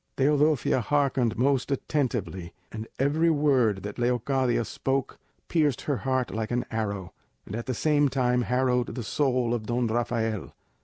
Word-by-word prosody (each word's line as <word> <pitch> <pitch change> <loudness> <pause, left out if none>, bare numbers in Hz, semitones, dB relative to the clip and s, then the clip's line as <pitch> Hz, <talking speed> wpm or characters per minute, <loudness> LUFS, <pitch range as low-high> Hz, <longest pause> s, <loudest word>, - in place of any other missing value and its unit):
Teodosia 145 -1 +3
hearkened 135 -3 +1
most 135 +2 +1
attentively, 120 - -2 0.2
and 110 0 -6
every 150 +5 +2
word 130 - +2
that 105 +3 -6
Leocadia 120 0 +1
spoke 135 +3 -2 0.3
pierced 150 -6 +1
her 145 -3 -1
heart 130 +3 -1
like 110 0 -3
an 120 0 -1
arrow, 100 -5 -3 0.3
and 100 - -6
at 115 - -5
the 130 - -1
same 145 +1 +2
time 125 -2 +1
harrowed 125 0 0
the 125 - -4
soul 125 -1 +1
of 110 -3 -3
Don 120 +1 0
Rafael. 115 -3 -1
125 Hz, 150 wpm, -27 LUFS, 115-140 Hz, 0.3 s, Teodosia